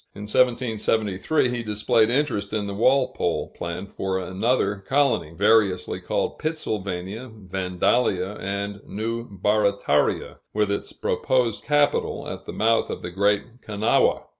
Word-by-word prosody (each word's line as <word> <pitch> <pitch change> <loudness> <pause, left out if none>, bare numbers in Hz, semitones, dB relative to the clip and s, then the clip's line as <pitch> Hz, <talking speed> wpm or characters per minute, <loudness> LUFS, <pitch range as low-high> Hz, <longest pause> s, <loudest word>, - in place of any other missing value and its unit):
In 100 - -7
1773, 115 +1 +1
he 120 -1 -2
displayed 110 +1 +2
interest 120 -7 0
in 105 -2 0
the 100 - -4
Walpole 130 +6 +1
plan 85 +3 -5
for 95 -1 -3
another 100 +3 0
colony, 130 - +1
variously 100 0 +2
called - - -2
Pittsylvania, 105 - -3
Vandalia, 95 0 0
and 100 +1 -4
New 115 +3 -3
Barataria 100 -5 +1 0.2
with 105 -1 +2
its 100 - -3
proposed 125 -4 0
capital 145 -1 +1
at - - -7
the - - -4
mouth 115 +1 +2
of - - -5
the 90 - -5
Great 105 +6 0
Kanawha. 105 0 +2
105 Hz, 125 wpm, -24 LUFS, 100-120 Hz, 0.2 s, displayed